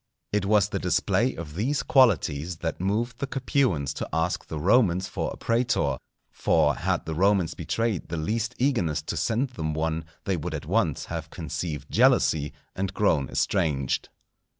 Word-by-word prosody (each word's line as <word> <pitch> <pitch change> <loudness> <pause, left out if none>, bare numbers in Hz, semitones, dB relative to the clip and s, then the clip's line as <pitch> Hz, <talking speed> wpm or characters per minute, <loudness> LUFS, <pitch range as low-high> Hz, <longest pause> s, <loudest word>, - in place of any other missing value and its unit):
It 105 -2 0
was 105 -2 +4
the - - -2
display - - +1
of 80 -2 -7
these 130 - 0
qualities 90 - +3
that 80 0 -3
moved 115 +5 -1
the 140 - -2
Capuans 125 - 0
to - - -5
ask 80 +2 -1
the 80 - -5
Romans 95 0 +3
for - - -3
a - - -8
prætor; 115 +1 +1 0.3
for 75 -2 +2
had - - -1
the 80 - -3
Romans 95 0 +2
betrayed 115 -5 -2
the 85 - -3
least 115 +9 -1
eagerness 90 - +1
to - - -4
send 120 +4 0
them 80 -10 -3
one, 80 0 -1 0.2
they 95 -3 0
would 80 +1 -4
at 75 - -6
once 85 -4 0
have - - -5
conceived 80 -5 -5
jealousy 75 -2 +3 0.2
and 95 0 -3
grown 80 -10 +2
estranged. 70 -6 0
90 Hz, 165 wpm, -26 LUFS, 80-115 Hz, 0.3 s, was